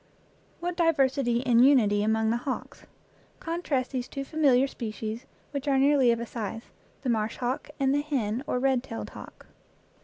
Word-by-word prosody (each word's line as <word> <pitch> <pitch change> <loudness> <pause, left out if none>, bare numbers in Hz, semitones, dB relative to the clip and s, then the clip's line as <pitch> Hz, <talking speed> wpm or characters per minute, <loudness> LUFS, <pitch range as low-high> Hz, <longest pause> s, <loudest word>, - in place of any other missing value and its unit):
What 350 0 -2
diversity 270 -7 +2
in 245 -3 +3
unity 240 -6 +5
among 220 +1 +1
the 235 - +1
hawks! 260 +2 -6 0.5
Con 335 +1 -3
trast 265 -7 -1
these 255 -2 -3
two 275 - -5
familiar 275 -4 +3
species 220 -3 -6 0.2
which 280 0 -4
are 275 -1 +3
nearly 275 -2 +4
of 235 - 0
a 235 - -3
size 225 -1 -6 0.3
the 260 - -1
marsh 220 -1 0
hawk 250 +4 -3
and 270 0 +2
the 290 - +2
hen, 255 -5 -2
or - - 0
red 260 -1 +2
tailed, 230 -3 -7
hawk. - - -12
255 Hz, 175 wpm, -27 LUFS, 230-275 Hz, 0.5 s, unity